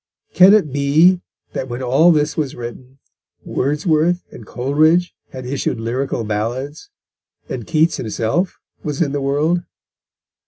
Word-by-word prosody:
Can 185 +5 +7
it 155 -11 +1
be 155 +6 +4 0.3
that 130 - -4
when 120 +2 -5
all 135 +8 +4
this 150 -1 +1
was 150 -4 -2
written, 125 +2 -9 0.5
Wordsworth 155 +5 0
and 110 - -12
Coleridge 155 +7 +2 0.2
had 130 -1 -8
issued 130 -3 -2
Lyrical 120 +2 -2
Ballads, 120 - -4 0.6
and - - -6
Keats 160 0 +2
himself 115 - -2 0.2
was 150 -2 -4
in 150 -5 +1
the 145 0 -2
world? 150 +6 +1
145 Hz, 130 wpm, -19 LUFS, 130-160 Hz, 0.6 s, Can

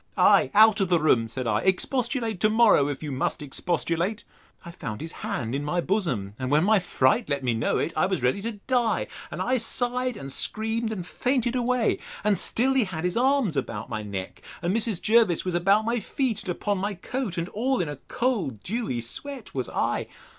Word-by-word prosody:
Ay, - - +5
out 220 0 +7
of 190 - +1
the 175 -2 +4
room, 125 -7 +3
said 125 +3 -5
I; 115 - +1
expostulate 230 +2 0
to 215 - +3
morrow, 215 -10 +5
if 145 +1 -4
you 150 - -4
must 130 +2 -2
expostulate! 170 +7 -1 0.4
I 170 - -7
found 110 -10 -6
his 160 +2 -6
hand 170 - -4
in 140 +1 -2
my 175 +4 -1
bosom; 170 - -1
and 130 -1 -2
when 150 +3 +4
my 215 +2 +4
fright 135 -7 +1
let 140 -2 -1
me 125 -2 +1
know 115 - 0
it, 165 - -1
I 185 - +2
was 190 -9 -2
ready 125 +11 +1
to 230 +2 -3
die; 245 -3 +1 0.2
and - - -3
I 255 0 +1
sighed 245 +1 0
and 135 -7 -7
screamed, 225 +1 -1
and 185 -5 -4
fainted 250 +4 0
away. 250 -1 +1 0.2
And 210 -1 +3
still 250 +8 +1
he 260 -4 +3
had 170 -4 -5
his 180 0 -1
arms 255 - +2
about 115 -6 -3
my 110 -2 -3
neck; 100 -3 -6 0.2
and 175 +4 +1
Mrs. 225 -5 0
Jervis 220 -7 +3
was 180 - -1
about 195 +5 +3
my 235 +1 0
feet, 235 +1 -2
and 185 - -8
upon 200 +2 -1
my 200 +1 -2
coat. 205 +1 -4
And 170 0 -1
all 255 +5 0
in 175 - 0
a 145 -1 -5
cold 200 - -1
dewy 205 - -2
sweat 255 - -7
was 130 -3 -3
I. - - -1
195 Hz, 210 wpm, -26 LUFS, 145-230 Hz, 0.4 s, out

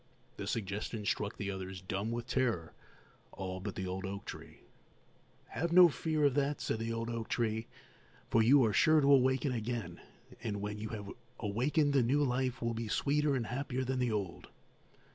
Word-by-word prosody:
The 100 - -5
suggestion 105 +1 -3
struck 105 -1 -1
the 100 -1 -3
others 95 -1 -6
dumb 95 +4 -3
with 120 0 -3
terror, 120 -10 0 0.6
all 95 -1 -5
but 100 +1 -5
the 95 - -3
old 95 +1 -4
oak 100 +1 -5
tree. - - -9 0.9
"Have 170 +1 -2
no 175 0 +9
fear 150 +3 0
of 140 - +4
that," 145 +1 0
said 110 - -2
the 115 +1 -2
old 115 0 -2
oak 115 -1 -4
tree, 110 -1 -1 0.6
"for 115 - +3
you 130 +3 +6
are 110 - +1
sure 155 +6 +5
to 140 -1 +5
awaken 130 +1 +3
again, 115 -7 -4 0.4
and 105 -4 -3
when 105 +1 -4
you 110 0 -4
have 105 -3 -6 0.3
awakened 135 +8 +1
the 135 - +5
new 135 +5 +2
life 125 -1 -1
will 115 0 0
be 115 0 -4
sweeter 145 +5 +1
and 120 -3 -1
happier 130 +2 -2
than 130 0 -1
the 125 -2 +1
old." 100 -5 -3
115 Hz, 185 wpm, -33 LUFS, 105-130 Hz, 0.9 s, no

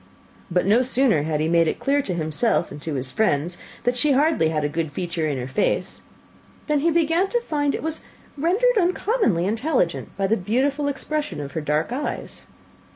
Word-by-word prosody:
But 180 0 +1
no 215 +5 +4
sooner 255 - +2
had 155 0 -1
he 155 - +1
made 165 0 +3
it - - -1
clear 285 +1 +1
to 185 -9 -3
himself 165 +5 0
and 145 - -9
his 135 -5 -3
friends 175 -4 0 0.2
that 245 0 +1
she 285 +3 +3
had 265 - +4
hardly 300 - +3
a 150 -2 0
good 160 0 -3
feature 170 -1 -2
in 145 -3 -1
her 125 0 -4
face, 130 - -1 0.6
than 300 -2 +1
he 330 +4 +2
began 335 +3 +2
to 480 - +1
find 295 -10 -1
it - - -5
was 320 0 -3 0.3
rendered 395 - +2
uncommonly 360 - +1
intelligent 220 - 0
by 195 - +1
the 220 +4 +2
beautiful 270 +9 0
expression 295 - -3
of 140 -1 -5
her 160 - -3
dark 150 +6 0
eyes. 285 +3 -4
225 Hz, 190 wpm, -23 LUFS, -, 0.6 s, no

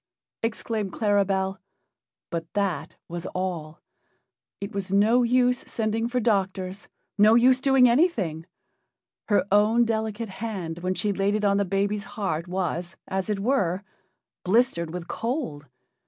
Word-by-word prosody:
exclaimed 220 -2 -2
Claribel, 195 -2 +1 0.7
but 165 -2 -4
that 180 -6 -1
was 175 0 -5
all. 170 -4 -3 0.8
It 200 +2 -5
was 200 -2 -4
no 215 +5 +4
use 250 +1 +3
sending 225 0 -1
for 250 +1 0
doctors 195 -4 -1 0.3
no 215 +2 +7
use 255 +2 +5
doing 265 -2 +5
anything. 220 - +1 0.8
Her 205 -4 +3
own 215 +4 +4
delicate 220 -1 -2
hand 190 -5 -5
when 185 +1 -1
she 205 +1 0
laid 195 +2 +1
it 210 -1 0
on 200 0 +3
the 200 - +1
baby's 200 +2 -1
heart 185 -5 -2
was, 180 -1 -3
as 190 +1 -2
it 210 - 0
were, 195 -5 +1 0.6
blistered 185 -5 +2
with 175 0 -6
cold. 220 - -3
200 Hz, 135 wpm, -25 LUFS, 185-225 Hz, 0.8 s, no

